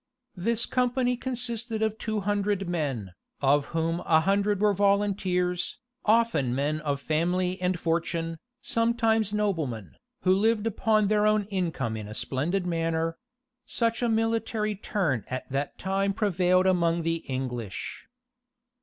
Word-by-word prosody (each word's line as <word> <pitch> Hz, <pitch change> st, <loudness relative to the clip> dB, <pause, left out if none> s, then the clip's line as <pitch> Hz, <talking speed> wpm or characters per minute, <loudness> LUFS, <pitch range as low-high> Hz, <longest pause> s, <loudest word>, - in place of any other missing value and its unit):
This 225 Hz, +5 st, 0 dB
company 250 Hz, 0 st, +1 dB
consisted 235 Hz, -3 st, -3 dB
of 220 Hz, 0 st, -1 dB
two 220 Hz, -2 st, -2 dB
hundred 200 Hz, -1 st, 0 dB
men, 135 Hz, -, -2 dB, 0.3 s
of 140 Hz, +1 st, +3 dB
whom 165 Hz, +1 st, -1 dB
a 160 Hz, -2 st, +3 dB
hundred 200 Hz, +2 st, +2 dB
were 210 Hz, 0 st, +4 dB
volunteers, 195 Hz, -3 st, +1 dB, 0.3 s
often 215 Hz, -, +3 dB
men 145 Hz, +3 st, 0 dB
of 145 Hz, -2 st, -2 dB
family 180 Hz, +5 st, 0 dB
and 180 Hz, -1 st, 0 dB
fortune, 165 Hz, -1 st, -1 dB, 0.2 s
sometimes 230 Hz, -3 st, +1 dB
noblemen, 165 Hz, -, -2 dB, 0.3 s
who 185 Hz, -, +4 dB
lived 215 Hz, +2 st, +2 dB
upon 215 Hz, -1 st, +2 dB
their 210 Hz, 0 st, +3 dB
own 215 Hz, 0 st, +3 dB
income 165 Hz, -, -1 dB
in 105 Hz, -2 st, -6 dB
a 105 Hz, -, -8 dB
splendid 170 Hz, -, -1 dB
manner: 165 Hz, -1 st, -1 dB, 0.5 s
such 230 Hz, 0 st, 0 dB
a 240 Hz, -, +2 dB
military 225 Hz, -1 st, 0 dB
turn 185 Hz, -, -1 dB
at 130 Hz, 0 st, -4 dB
that 140 Hz, +1 st, -2 dB
time 195 Hz, +1 st, 0 dB
prevailed 185 Hz, -3 st, +2 dB
among 170 Hz, -2 st, +2 dB
the 165 Hz, 0 st, 0 dB
English. 125 Hz, -6 st, -4 dB
185 Hz, 135 wpm, -27 LUFS, 160-215 Hz, 0.5 s, were